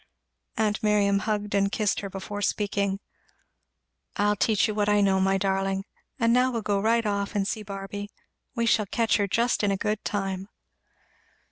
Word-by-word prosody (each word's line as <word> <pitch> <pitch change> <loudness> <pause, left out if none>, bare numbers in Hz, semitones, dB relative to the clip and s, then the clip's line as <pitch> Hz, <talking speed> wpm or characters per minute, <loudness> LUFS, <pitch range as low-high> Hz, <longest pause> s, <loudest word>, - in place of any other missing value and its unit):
Aunt 215 -1 +1
Miriam 205 -2 +3
hugged 210 -1 -2
and 200 0 +2
kissed 210 -2 0
her 200 - -5
before 195 +2 -6
speaking. 200 -1 0 1.2
"I'll 205 0 +2
teach 215 +2 +2
you 215 - -2
what 210 0 +1
I 210 0 +4
know, 195 -1 +3
my 195 +1 +2
darling; 195 0 -1 0.3
and 230 -1 +3
now 250 +1 +4
we'll 230 -3 -3
go 200 -1 +1
right 230 +2 +2
off 200 +1 -1
and 195 -1 +1
see 215 - -2
Barby 200 0 -6 0.5
we 235 -1 0
shall 215 -2 +2
catch 230 +3 +1
her 205 -1 +1
just 235 +5 +1
in 205 - +3
a 195 - +1
good 210 +1 -2
time." 195 -1 -3
205 Hz, 175 wpm, -26 LUFS, 195-215 Hz, 1.2 s, I